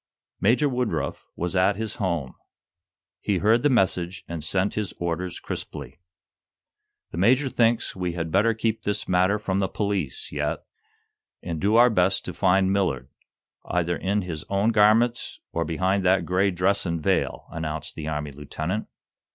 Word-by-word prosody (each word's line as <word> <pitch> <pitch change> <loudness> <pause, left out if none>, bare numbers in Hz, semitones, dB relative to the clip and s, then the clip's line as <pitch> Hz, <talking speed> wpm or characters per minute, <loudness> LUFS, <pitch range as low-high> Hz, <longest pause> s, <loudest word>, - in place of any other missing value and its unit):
Major 125 +9 +3
Woodruff 125 -3 -2
was 90 +2 -2
at 95 +2 +3
his 110 +1 -4
home. 85 -10 -2 0.9
He 100 - 0
heard 110 +5 +3
the 145 - +3
message 95 -7 +1
and 85 -3 -5
sent 95 +4 0
his 105 -2 -3
orders 85 +1 -3
crisply. - - -7 1.1
"The 85 - -4
major 130 +8 +4
thinks 115 -1 +1
we 90 -2 -2
had 80 -2 -3
better 110 +5 +3
keep 110 0 -1
this 105 +1 -2
matter 95 +3 +3
from 100 -2 -1
the 95 - +1
police, 100 -9 -2
yet, - - -2 0.8
and 85 -3 -4
do 105 +3 +2
our 120 +1 +7
best 95 -2 +2
to - - -4
find 95 0 +3
Millard, 65 -11 0 0.6
either 85 -1 0
in 100 +3 -1
his 80 -4 -5
own 100 +3 +2
garments, 110 +3 +3
or 85 - 0
behind 95 +4 0
that 95 +1 +3
gray 95 +2 +2
dress 95 +2 +1
and 85 -2 -2
veil," 75 - 0
announced 80 -1 -4
the 80 -1 -6
Army 75 -1 -3
lieutenant. 80 +8 -4
95 Hz, 160 wpm, -25 LUFS, 85-105 Hz, 1.1 s, our